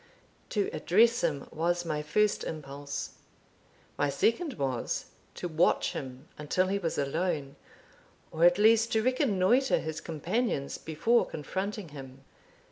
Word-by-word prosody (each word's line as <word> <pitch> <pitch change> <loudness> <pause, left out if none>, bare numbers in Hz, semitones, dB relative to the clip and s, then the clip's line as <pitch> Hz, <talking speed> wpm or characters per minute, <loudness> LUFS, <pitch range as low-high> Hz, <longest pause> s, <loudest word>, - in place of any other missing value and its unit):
To 205 -4 0
address 230 +6 +3
him 150 -5 0
was 175 +2 0
my 155 -2 -2
first 210 +8 +1
impulse; 140 -2 -5 0.9
my 145 - +2
second 270 - +1
was, 130 - -2 0.3
to 180 - -4
watch 165 +1 +2
him 130 -1 -7
until 185 +5 0
he 200 +1 0
was 165 -4 -2
alone, 145 -1 -1 0.8
or 160 - -1
at 175 +1 +6
least 225 +2 +4
to 220 -1 +2
reconnoitre 255 -1 +3
his 160 -1 -4
companions 165 - -2
before 225 +10 +1
confronting 190 +4 -4
him. 135 -2 -11
170 Hz, 125 wpm, -29 LUFS, 145-210 Hz, 0.9 s, at